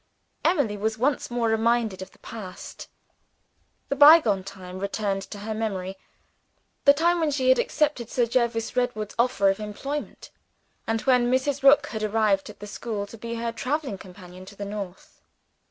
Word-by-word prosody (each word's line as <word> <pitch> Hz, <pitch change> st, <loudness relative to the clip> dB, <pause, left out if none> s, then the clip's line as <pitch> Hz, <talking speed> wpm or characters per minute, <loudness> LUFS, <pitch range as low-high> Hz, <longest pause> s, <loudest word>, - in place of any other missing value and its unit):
Emily 285 Hz, -, +2 dB
was 220 Hz, +2 st, -1 dB
once 265 Hz, +4 st, 0 dB
more 240 Hz, -1 st, 0 dB
reminded 225 Hz, -3 st, +1 dB
of 190 Hz, -, -7 dB
the -, -, -24 dB
past. 200 Hz, -5 st, -9 dB, 1.0 s
The 275 Hz, -, 0 dB
bygone 285 Hz, -, +7 dB
time 185 Hz, -1 st, -9 dB
returned 200 Hz, 0 st, -2 dB
to 210 Hz, -, -7 dB
her 215 Hz, +2 st, -5 dB
memory 195 Hz, -4 st, -3 dB, 0.9 s
the 280 Hz, -, +9 dB
time 340 Hz, +3 st, +2 dB
when 320 Hz, -2 st, +1 dB
she 265 Hz, -3 st, +1 dB
had 260 Hz, -, +5 dB
accepted 290 Hz, -6 st, 0 dB
Sir 245 Hz, -, +1 dB
Jervis 235 Hz, -1 st, 0 dB
Redwood's 245 Hz, -4 st, -1 dB
offer 220 Hz, -5 st, +3 dB
of 195 Hz, -, -5 dB
employment, 275 Hz, +8 st, -6 dB, 0.6 s
and 225 Hz, 0 st, 0 dB
when 250 Hz, -2 st, +3 dB
Mrs. 260 Hz, +2 st, 0 dB
Rook 280 Hz, +1 st, +6 dB
had 220 Hz, -, -5 dB
arrived 215 Hz, -2 st, +1 dB
at -, -, -13 dB
the -, -, -6 dB
school 210 Hz, 0 st, -4 dB
to 205 Hz, -, -12 dB
be 235 Hz, +1 st, -5 dB
her 230 Hz, 0 st, -2 dB
traveling 255 Hz, -1 st, -3 dB
companion 180 Hz, -1 st, -12 dB
to 200 Hz, +2 st, -13 dB
the 200 Hz, -, -6 dB
North. 200 Hz, -3 st, -8 dB
225 Hz, 170 wpm, -25 LUFS, 200-255 Hz, 1.0 s, the